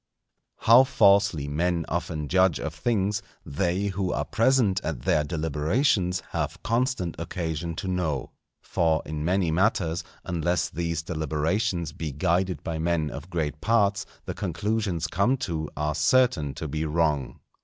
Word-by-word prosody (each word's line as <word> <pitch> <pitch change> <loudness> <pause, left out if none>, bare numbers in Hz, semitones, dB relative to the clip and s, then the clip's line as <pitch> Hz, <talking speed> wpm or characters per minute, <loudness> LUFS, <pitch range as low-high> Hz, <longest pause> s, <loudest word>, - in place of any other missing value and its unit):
_ - - -13
How 120 +3 +8
falsely 100 - +3
men 85 +3 0
often 80 -3 -3
judge 95 -1 +3
of - - -4
things, 105 -2 0 0.2
they 90 +6 -1
who 95 -1 -2
are - - -1
present 115 -5 +2
at - - -4
their 75 - +2
deliberations 90 - 0
have - - -3
constant 115 - 0
occasion 85 -1 -3
to 95 - -5
know. 85 -8 -1 0.3
For 80 -2 +1
in 75 0 -4
many 90 0 +1
matters, 85 -2 +1 0.2
unless 85 0 0
these 85 -1 -2
deliberations 80 +3 -1
be 75 0 -5
guided 90 +6 0
by 80 -2 -3
men 80 -2 0
of 75 +6 -8
great 75 -4 -2
parts, 105 -2 +2 0.2
the - - -4
conclusions 95 -1 -1
come 100 +10 +1
to 80 -3 -3
are 75 0 0
certain 95 - +2
to 80 - -5
be 75 +2 -2
wrong. 75 -3 0
85 Hz, 145 wpm, -26 LUFS, 80-100 Hz, 0.3 s, How